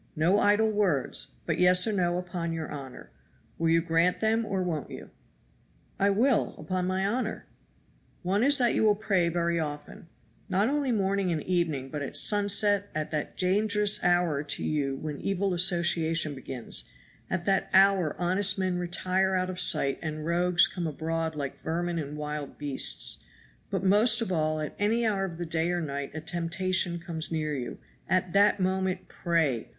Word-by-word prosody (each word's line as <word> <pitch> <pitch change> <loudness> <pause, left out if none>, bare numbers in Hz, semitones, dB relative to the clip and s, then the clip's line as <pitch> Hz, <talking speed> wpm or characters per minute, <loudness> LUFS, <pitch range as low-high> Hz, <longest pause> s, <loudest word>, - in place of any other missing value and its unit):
No 175 +6 +3
idle 210 +2 +3
words 190 -11 0
but - - -1
yes 180 0 +6
or 220 - 0
no 175 -3 +1
upon 175 -2 -4
your 160 -2 -5
honor. 135 -3 -9 0.5
Will 165 0 +1
you 165 0 +3
grant 165 +1 +2
them 225 0 +1
or 190 -2 -1
won't 160 -6 -3
you?" - - -10 0.9
"I 200 - +3
will, 230 +4 +2
upon 180 +4 -2
my 190 +1 0
honor." 220 +2 -2 0.8
"One 195 +5 +1
is 280 +2 +5
that 245 -3 +2
you - - +1
will 210 -1 +4
pray 195 -5 +1
very 170 0 0
often, 150 +1 -6 0.4
not 200 +5 +2
only 285 -2 0
morning 195 -3 0
and 155 -3 -2
evening, 165 -7 -1
but 150 +1 -5
at 140 - -5
sunset, 205 -1 +2
at 155 -1 -3
that 150 -1 -4
dangerous 205 +2 +2
hour 175 -4 +2
to 150 - -3
you 140 -3 -1
when 150 0 -6
evil 195 0 -1
association 170 -3 +1
begins; 130 -3 -3 0.4
at 175 - -2
that 195 -1 +1
hour 190 -4 +4
honest 185 +3 +1
men 185 -2 -1
retire 185 +2 0
out 185 0 0
of 180 - -6
sight 140 -6 +1
and 155 -1 -5
rogues 175 +1 +3
come 175 -3 -4
abroad 160 +1 -3
like 140 -2 -5
vermin 170 +1 -2
and 150 0 -5
wild 150 -1 -5
beasts; 145 -2 0 0.5
but 190 -2 -2
most 210 +5 +4
of 230 -5 -2
all 155 -2 0
at 150 - -5
any 225 +3 +1
hour 200 -3 0
of 170 -3 -7
the 175 - -4
day 160 +1 -1
or 175 0 0
night 140 -3 -4
a 155 - -4
temptation 175 +2 -1
comes 170 -1 -4
near 155 -2 -1
you, 125 -3 -5 0.3
at 185 -1 +1
that 205 +1 +4
moment 185 0 -1
pray! 160 - -1
175 Hz, 175 wpm, -28 LUFS, 160-195 Hz, 0.9 s, yes